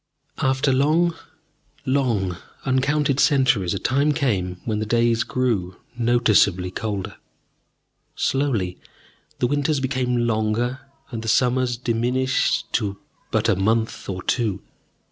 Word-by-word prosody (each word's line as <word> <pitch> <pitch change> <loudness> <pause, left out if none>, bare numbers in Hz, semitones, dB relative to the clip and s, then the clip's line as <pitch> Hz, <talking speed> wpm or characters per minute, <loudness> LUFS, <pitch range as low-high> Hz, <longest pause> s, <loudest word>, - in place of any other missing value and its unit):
After 135 +1 +2
long, 155 +6 +3 0.7
long 120 -9 0 0.3
uncounted 140 +1 +1
centuries, 125 -12 +3
a - - -1
time 140 +7 +1
came 100 - -1
when 110 -2 -1
the 110 - -2
days 115 0 +2
grew 105 -8 -1 0.2
noticeably 110 -6 +3
colder. 100 -1 -4 1.0
Slowly 120 -10 0 0.6
the - - +1
winters 145 +3 +1
became 125 -2 0
longer, 115 +3 0 0.3
and 115 -2 -4
the 115 - -7
summers 125 +1 +2
diminished 125 +2 0
to 100 -1 -1 0.3
but - - +1
a - - +3
month 110 +4 0
or 95 -1 -4
two. 110 -6 -1
120 Hz, 115 wpm, -22 LUFS, 105-130 Hz, 1.0 s, long